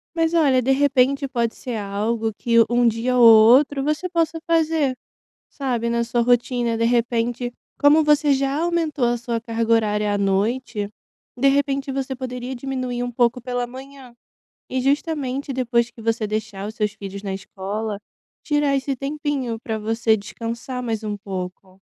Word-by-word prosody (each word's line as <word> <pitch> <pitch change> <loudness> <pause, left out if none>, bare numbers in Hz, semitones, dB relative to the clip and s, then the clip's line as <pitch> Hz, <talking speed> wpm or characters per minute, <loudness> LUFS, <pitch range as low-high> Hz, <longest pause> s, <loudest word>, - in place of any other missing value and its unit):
Mas 330 0 +1
olha, 275 -6 +4
de 255 - -2
repente 275 0 +2
pode 235 -3 -1
ser 245 -2 -5
algo 215 +2 -2
que 230 -1 +1
um 240 0 +3
dia 230 +3 0
ou 245 - +5
outro 245 +6 +6
você 305 +5 -1
possa 330 -2 0
fazer, 320 -5 +1 0.5
sabe, 245 -4 -2
na 235 0 0
sua 235 +1 0
rotina, 240 -1 +1
de 230 - 0
repente 240 +1 0 0.3
como 300 +2 +5
você 295 -1 +4
já 275 0 0
aumentou 325 -6 0
a 240 0 +1
sua 235 -1 -3
carga 230 0 -1
horária 210 -2 +2
à 205 - 0
noite, 205 +2 -1 0.5
de 275 +3 +3
repente 275 0 +1
você 270 0 -3
poderia 250 0 -5
diminuir 255 -1 -3
um 245 - -2
pouco 240 +1 +1
pela 245 0 -3
manhã 260 0 -11 0.6
e 260 - -1
justamente 280 -1 -1
depois 240 -2 +1
que 235 - -14
você 225 -1 -1
deixar 210 -2 -4
os 215 - -8
seus 210 -1 0
filhos 200 -1 -8
na 195 -1 -3
escola, 200 +2 -5 0.5
tirar 295 -2 +1
esse 270 0 -2
tempinho 275 -4 -3
pra 220 -2 -3
você 225 +1 +1
descansar 230 +4 -6
mais 225 -2 -3
um 210 -1 -2
pouco. 190 -1 -7
245 Hz, 165 wpm, -22 LUFS, 225-275 Hz, 0.6 s, outro